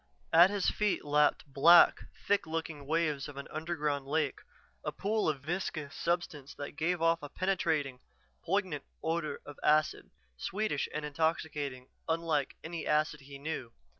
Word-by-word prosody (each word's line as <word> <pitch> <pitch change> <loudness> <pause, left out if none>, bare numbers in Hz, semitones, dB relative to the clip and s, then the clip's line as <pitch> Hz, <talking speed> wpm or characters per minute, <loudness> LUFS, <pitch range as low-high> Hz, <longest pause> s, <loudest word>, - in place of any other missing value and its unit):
At 170 +3 +8
his 200 -2 +1
feet 210 -6 0
lapped 150 0 +3
black, 155 +5 +6 0.2
thick 205 -4 +2
looking 160 -3 -4
waves 155 -3 0
of 145 -2 -10
an 140 - -6
underground 150 -4 -2
lake, 150 -1 0 0.4
a - - -2
pool 210 -2 0
of 140 -3 -2
viscous 155 -2 -3
substance 170 -5 -2
that 145 - -6
gave 165 +2 0
off 165 0 +3
a 145 - -7
penetrating, 160 -9 0 0.4
poignant 180 -5 -1 0.2
odor 160 -2 -1
of 145 - -10
acid, 155 0 +2 0.3
sweetish 195 - -1
and 150 0 -3
intoxicating, 150 -4 -2 0.2
unlike 160 -4 0
any 165 0 -5
acid 150 0 +1
he 140 +1 -10
knew. 140 -5 -5
155 Hz, 145 wpm, -32 LUFS, 145-170 Hz, 0.4 s, At